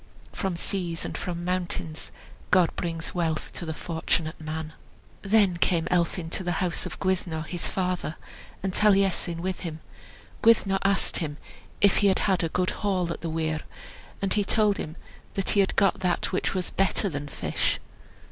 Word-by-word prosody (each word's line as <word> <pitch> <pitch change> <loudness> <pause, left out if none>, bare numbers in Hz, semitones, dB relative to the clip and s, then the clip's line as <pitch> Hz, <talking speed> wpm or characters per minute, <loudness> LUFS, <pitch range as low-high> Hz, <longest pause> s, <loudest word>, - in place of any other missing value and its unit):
From 190 -2 -2
seas 170 -1 -2
and - - -4
from 175 -1 -4
mountains 175 -3 -2 0.4
God 180 -3 +4
brings 165 -2 -3
wealth 165 -3 -1
to 170 - -5
the 160 - -2
fortunate 160 -1 -2
man." 155 0 -4 0.5
Then 200 -3 +4
came 170 -1 +2
Elphin 170 -1 +1
to 190 - -1
the 175 -1 0
house 180 0 -1
of - - -8
Gwyddno, 180 -4 0
his 175 +1 -2
father, 180 -4 -1 0.5
and 190 -1 -1
Taliesin 195 -5 +3
with 185 -1 -2
him. 160 -3 -5 0.6
Gwyddno 205 -4 +5
asked 195 0 +2
him 150 -4 -3 0.4
if 200 - +6
he 205 - +4
had 190 - +4
had 190 -3 +2
a 165 - +1
good 180 +2 +1
haul 185 -4 +1
at - - -10
the 165 - -3
weir, 160 -1 -1 0.6
and 195 - +2
he 205 - +2
told 210 0 +3
him 155 +1 -5 0.4
that 195 - +1
he 205 - +3
had 195 - +3
got 195 -2 +3
that 180 -2 0
which 185 - 0
was 185 -1 -1
better 195 +2 +2
than 145 -4 -3
fish. 140 - -1
180 Hz, 175 wpm, -27 LUFS, 165-195 Hz, 0.6 s, if